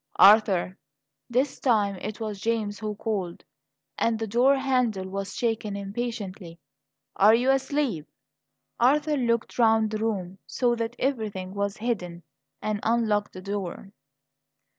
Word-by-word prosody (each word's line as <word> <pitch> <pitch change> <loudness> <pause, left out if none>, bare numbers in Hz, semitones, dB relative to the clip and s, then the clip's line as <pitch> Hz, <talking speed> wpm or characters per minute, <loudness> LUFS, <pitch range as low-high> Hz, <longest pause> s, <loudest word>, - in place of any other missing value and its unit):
"Arthur!" 195 -3 +5 0.5
This 255 +3 0
time 210 -6 +2
it 210 +4 -6
was 210 -3 -5
James 220 -3 -1
who 210 -1 -4
called, 200 -5 -3 0.6
and 230 -1 +1
the 225 - -3
door 245 +6 +4
handle 250 -8 0
was 195 0 -5
shaken 220 -3 -1
impatiently. 200 -4 -5 0.6
"Are 210 +3 +7
you 250 +3 +3
asleep?" 270 - -1 0.7
Arthur 295 +5 +3
looked 235 -3 -1
round 220 -2 +4
the 215 - -2
room, 195 -4 -3
saw 245 -2 +1
that 230 +1 -3
everything 215 -8 -2
was 200 0 -2
hidden, 180 -7 -3 0.4
and 215 -1 -1
unlocked 220 -3 +1
the 185 - -8
door. 195 -1 -5
215 Hz, 130 wpm, -26 LUFS, 195-235 Hz, 0.7 s, Are